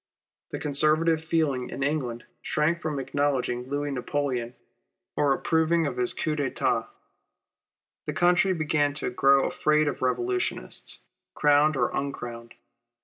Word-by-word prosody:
The -, -, -4 dB
Conservative 155 Hz, +3 st, +1 dB
feeling 155 Hz, -6 st, 0 dB
in 135 Hz, -, -4 dB
England 130 Hz, -5 st, -2 dB, 0.2 s
shrank 160 Hz, +3 st, 0 dB
from 155 Hz, -2 st, -3 dB
acknowledging 135 Hz, -2 st, -1 dB
I 125 Hz, +1 st, -10 dB
ouis 145 Hz, 0 st, -2 dB
Napoleon 125 Hz, -2 st, -2 dB, 0.6 s
or 145 Hz, -1 st, +2 dB
approving 160 Hz, +3 st, +2 dB
of 135 Hz, -4 st, -3 dB
his 125 Hz, -1 st, +1 dB
coup 155 Hz, -, -1 dB
d'etat. 145 Hz, -4 st, -1 dB, 1.2 s
The -, -, -2 dB
country 180 Hz, +2 st, +3 dB
began 150 Hz, -3 st, 0 dB
to 145 Hz, -, -3 dB
grow 135 Hz, +2 st, +4 dB
afraid 150 Hz, 0 st, +2 dB
of -, -, -3 dB
revolutionists, 365 Hz, -, -1 dB, 0.3 s
crowned 150 Hz, 0 st, +4 dB
or" 120 Hz, -, +1 dB
uncrowned. 120 Hz, -4 st, -5 dB
145 Hz, 130 wpm, -26 LUFS, 130-155 Hz, 1.2 s, grow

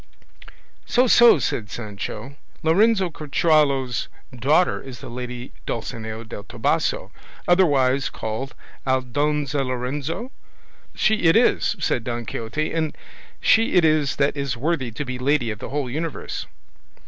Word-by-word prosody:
"So, 250 Hz, +1 st, +4 dB
so!" 235 Hz, -4 st, +7 dB
said 115 Hz, -6 st, -2 dB
Sancho; 105 Hz, +4 st, -6 dB, 0.3 s
"Lorenzo 190 Hz, +3 st, +3 dB
Corchuelo's 145 Hz, -5 st, +1 dB, 0.3 s
daughter 145 Hz, +9 st, +2 dB
is 130 Hz, -2 st, -9 dB
the -, -, -9 dB
lady 125 Hz, 0 st, -6 dB, 0.2 s
Dulcinea 110 Hz, 0 st, -4 dB
del 105 Hz, -2 st, -8 dB
Toboso, -, -, -1 dB, 0.4 s
otherwise 140 Hz, -7 st, +3 dB
called 110 Hz, +5 st, -5 dB, 0.3 s
Aldonza 140 Hz, +2 st, 0 dB
Lorenzo?" 135 Hz, -, -3 dB, 0.6 s
"She 220 Hz, -1 st, +3 dB
it 165 Hz, -, +6 dB
is," 230 Hz, -2 st, +3 dB
said 135 Hz, -8 st, 0 dB
Don 120 Hz, 0 st, -4 dB
Quixote, 115 Hz, +9 st, -3 dB
"and 160 Hz, -2 st, -1 dB, 0.4 s
she 225 Hz, +1 st, +3 dB
it 180 Hz, -3 st, +5 dB
is 155 Hz, -3 st, +2 dB
that 140 Hz, +1 st, +1 dB
is 140 Hz, -3 st, -2 dB
worthy 145 Hz, -1 st, -1 dB
to 115 Hz, +6 st, -5 dB
be 125 Hz, -1 st, -5 dB
lady 130 Hz, -3 st, +1 dB
of 105 Hz, -, -7 dB
the -, -, -6 dB
whole 145 Hz, -1 st, -2 dB
universe." 155 Hz, +5 st, -4 dB
140 Hz, 130 wpm, -23 LUFS, 120-160 Hz, 0.6 s, so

